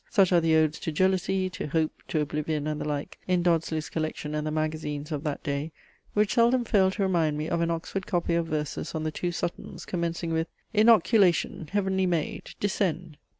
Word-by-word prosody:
Such 195 -5 +4
are 170 - +5
the 160 -1 +3
Odes 155 0 +2
to 160 - -3
jealousy, 190 +2 +1
to 170 - -5
Hope, 155 +1 +1 0.2
to 155 - 0
Oblivion, 150 0 -2
and 150 -1 -2
the - - -3
like, 145 -1 -4
in 180 -1 +2
Dodsley's 165 -2 +1
collection 155 -1 -3
and 150 0 -2
the - - 0
magazines 155 -1 -3
of 150 -1 -3
that 150 -2 -3
day, 145 +2 -2 0.4
which 210 -1 +3
seldom 240 +1 +3
fail 195 -4 +4
to 195 +1 -2
remind 165 -5 +1
me 155 +1 -2
of 170 - 0
an 170 - +1
Oxford 170 +3 -3
copy 175 -2 0
of 170 -1 +1
verses 150 0 -3
on 155 - -2
the 155 - -1
two 175 +3 -2
SUTTONS, 170 0 -5
commencing 170 -1 -2
with 160 +1 0 0.3
"Inoculation, 210 -7 +4
heavenly 190 -2 +1
maid! 170 -4 -2
descend!" 180 -6 -1
165 Hz, 195 wpm, -27 LUFS, 155-190 Hz, 0.4 s, are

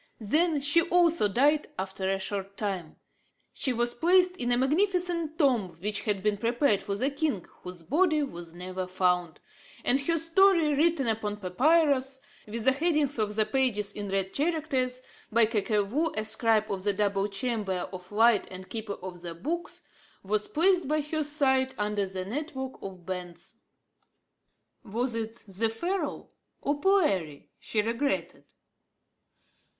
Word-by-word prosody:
Then 300 - +2
she 290 +4 +5
also 340 - +3
died 285 +8 +2
after 190 0 -3
a 195 - +1
short 195 0 -4
time. 190 -7 -4 0.6
She 265 - 0
was 240 0 0
placed 360 +5 +3
in 245 - -2
the 245 - +3
magnificent 335 +2 0
tomb 235 - +2
which 210 +3 -2
had 200 -3 -1
been 210 -1 +1
prepared 235 -1 +2
for 200 - -3
the 260 +7 0
king, 280 - -1 0.2
whose 180 -2 -9
body 310 - +2
was 170 -10 -7
never 185 +2 -5
found; 180 -2 0 0.5
and 270 +3 +3
her 330 +4 +1
story, 330 -1 +4
written 300 -2 +2
upon 215 -2 -1
papyrus, 265 - +2 0.3
with 220 +1 -4
the 265 - +7
headings 300 -3 +1
of 210 -1 -1
the 215 0 +2
pages 215 -4 0
in 205 -1 -6
red 195 0 -1
characters, 275 -5 -1 0.3
by 230 +1 +5
Kakevou, 215 +7 0
a 215 - 0
scribe 220 -1 +2
of 190 -2 -3
the 205 0 +1
double 200 0 0
chamber 205 -3 -2
of 180 +1 -9
light 225 0 +4
and 185 0 -10
keeper 220 -2 -4
of 180 -2 -7
the 170 -1 -7
books, 335 - -4 0.4
was 210 +2 -1
placed 355 0 +2
by 305 +1 +1
her 310 +1 -2
side 265 -3 +1
under 210 -1 -1
the 185 -1 -5
network 265 - -5
of 185 -3 -9
bands. 180 -2 -7 1.3
Was 240 +3 -2
it 225 0 -5
the 205 +4 0
Pharaoh 350 - -3 0.3
or 290 0 -2
Poëri 195 - +1
she 210 -2 -1
regretted? 235 +6 -2
230 Hz, 150 wpm, -28 LUFS, 195-295 Hz, 1.3 s, the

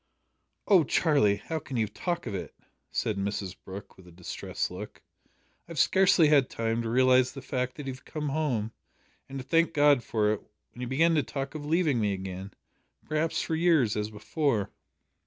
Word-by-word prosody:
"O 190 -5 +6
Charlie! 140 - +3
how 160 +11 -4
can 135 -3 -6
you 110 -2 +1
talk 175 - -3
of 115 - -4
it?" 95 - -5 0.3
said 105 - -1
Mrs 100 -1 -3
Brooke, 95 +2 -9
with 95 -1 -16
a - - -13
distressed 85 +1 -4
look. - - -9
"I 170 - -18
have - - -10
scarcely 185 -2 +5
had 140 -4 +4
time 115 0 -1
to 115 - -3
realise 130 +1 +4
the 135 - -7
fact 125 -1 -2
that 145 - -7
you 135 - -3
have 130 - -13
come 150 -2 -4
home, 135 -8 -1 0.6
and 135 - -6
to 130 - -5
thank 165 +5 +2
God 145 -3 +5
for 105 -1 +1
it, 110 - -5 0.3
when 120 - -11
you 125 - -3
begin 160 +7 +3
to 155 - +3
talk 135 +1 -5
of 150 -2 -6
leaving 160 -5 +2
me 105 -2 +1
again 95 0 -6 0.5
perhaps 155 +1 0
for 165 - -3
years, 160 -9 +3
as 105 0 -2
before." 110 0 -1
130 Hz, 195 wpm, -28 LUFS, 105-155 Hz, 0.6 s, O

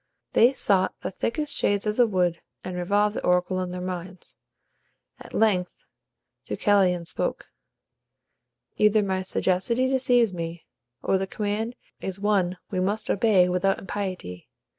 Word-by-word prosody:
They 240 +3 +6
sought 195 -8 +1
the - - -4
thickest 295 - -2
shades 200 0 +1
of 210 0 0
the 245 0 +4
wood, 180 -4 0 0.2
and 185 -1 -5
revolved 205 +4 +1
the - - -4
oracle 180 +1 +1
in 180 - -3
their 180 0 -5
minds. 180 0 -6 0.8
At - - -12
length 190 -5 0 0.6
Deucalion 185 -4 +2
spoke: - - -3 1.3
"Either 210 0 +4
my 190 -1 -1
sagacity 190 +7 0
deceives 250 -5 +3
me, 165 -1 -6 0.4
or 190 - +2
the 195 - -2
command 215 +4 -3 0.2
is 190 0 -4
one 195 -3 +1
we 185 - -1
may 195 +3 +1 0.2
obey 195 -4 +4
without 180 +2 +1
impiety. 185 - -5
190 Hz, 140 wpm, -25 LUFS, 180-210 Hz, 1.3 s, They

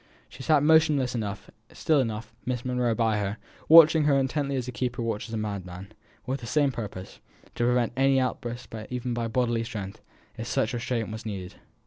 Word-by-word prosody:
She - - -12
sat 145 +1 +3
motionless 150 -5 +4
enough, 105 -4 -5 0.2
still 155 -3 +2
enough, 110 -3 -3
Miss 125 -1 -3
Monro 125 -2 0
by 110 -2 +1
her, 100 +1 -2 0.3
watching 160 -1 +8
her 145 -2 +4
as 135 - +3
intently 140 +1 -1
as 130 -2 -2
a - - -3
keeper 125 -1 -3
watches 115 0 -3
a 115 - -2
madman, 95 -4 -5
and - - -22 0.3
with 135 +2 -2
the 115 - -8
same 145 +2 +2
purpose 100 -6 -7 0.3
to 120 - -1
prevent 120 -1 +1
any 135 +1 +3
outburst 120 -2 -4 0.2
even 125 -1 -3
by 120 -1 -2
bodily 120 -1 0
strength, 105 -4 -7 0.4
if 115 - -4
such 115 +2 0
restraint 120 -2 -2
be 110 - -5
needed. 95 -3 -6
120 Hz, 190 wpm, -27 LUFS, 110-130 Hz, 0.4 s, watching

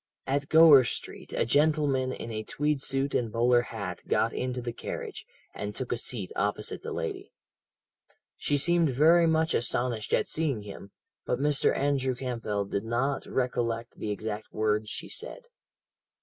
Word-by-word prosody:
"At 140 +1 -1
Gower 160 -4 +8
Street, 115 - -5
a - - 0
gentleman 145 -1 +2
in 115 - -6
a 110 -1 -3
tweed 145 +5 -1
suit 135 +1 0
and 115 -3 0
bowler 120 +1 +3
hat 100 -7 -6
got - - +1
into 125 0 -2
the 120 -1 -4
carriage, - - -6 0.3
and 105 0 -5
took 130 - -4
a 120 - 0
seat 105 -7 -1
opposite 105 +1 -1
the - - -6
lady. - - -4 1.0
"She 145 - 0
seemed 170 +2 +3
very 165 +6 +5
much 160 0 +2
astonished 120 -2 0
at - - +2
seeing 145 -9 0
him, 100 -1 -10 0.3
but 125 - -1
Mr. 145 +1 +2
Andrew 135 -2 0
Campbell 115 -5 -3
did 100 +1 -3
not 120 +5 -1
recollect 120 -2 -2
the 105 - -3
exact 105 +1 -4
words 105 0 0
she - - -6
said. - - -7
125 Hz, 160 wpm, -28 LUFS, 110-145 Hz, 1.0 s, Gower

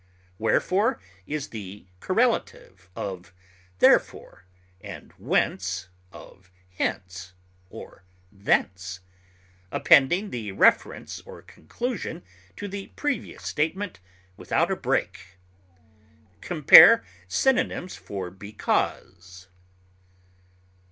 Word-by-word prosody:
Wherefore 185 - +1 0.3
is 150 0 -4
the 105 -3 -9
correlative 90 -1 -1
of 95 -1 -7 0.4
therefore, 95 - +2 0.4
and - - -10
whence 95 0 -1 0.2
of 95 -2 -15 0.3
hence 90 -1 -4 0.4
or - - -12 0.3
thence, 95 -2 -1 0.7
appending 175 +10 +4
the 110 -4 -5
inference 95 - +1
or - - -13
conclusion 190 - -6 0.3
to 205 - -6
the 200 0 -7
previous 290 -2 -4
statement 170 - -3 0.4
without - - 0
a - - +1
break. 95 0 -3 1.0
Compare 170 +6 +8 0.2
synonyms 185 - 0
for 95 -3 -7
BECAUSE. 95 -2 -4
100 Hz, 80 wpm, -25 LUFS, -, 1.0 s, Compare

